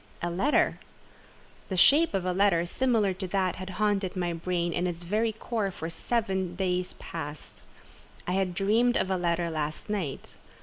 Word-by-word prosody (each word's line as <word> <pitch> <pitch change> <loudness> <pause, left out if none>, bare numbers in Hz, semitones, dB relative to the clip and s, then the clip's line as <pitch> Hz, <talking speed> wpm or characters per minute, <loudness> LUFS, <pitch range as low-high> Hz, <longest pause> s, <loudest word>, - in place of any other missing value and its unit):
A 175 - 0
letter! 195 +13 +2 0.9
The 190 - -2
shape 290 - +5
of 185 -2 -1
a 180 - +1
letter 185 -3 +3
similar 220 -1 +1
to 185 +1 -5
that 185 -1 0
had 185 0 -6
haunted 205 -2 +1
my 175 -2 -1
brain 170 0 -1
in 180 +1 0
its 175 -1 -5
very 215 +6 +1
core 220 -1 -2
for 170 -3 -6
seven 190 -2 -1
days 180 -1 -1
past. 150 -2 -8 0.6
I - - -2
had 185 -1 0
dreamed 225 +6 +3
of 190 - 0
a - - +2
letter 170 -1 0
last 155 +5 -3
night. 180 -10 -3
185 Hz, 170 wpm, -28 LUFS, 175-205 Hz, 0.9 s, shape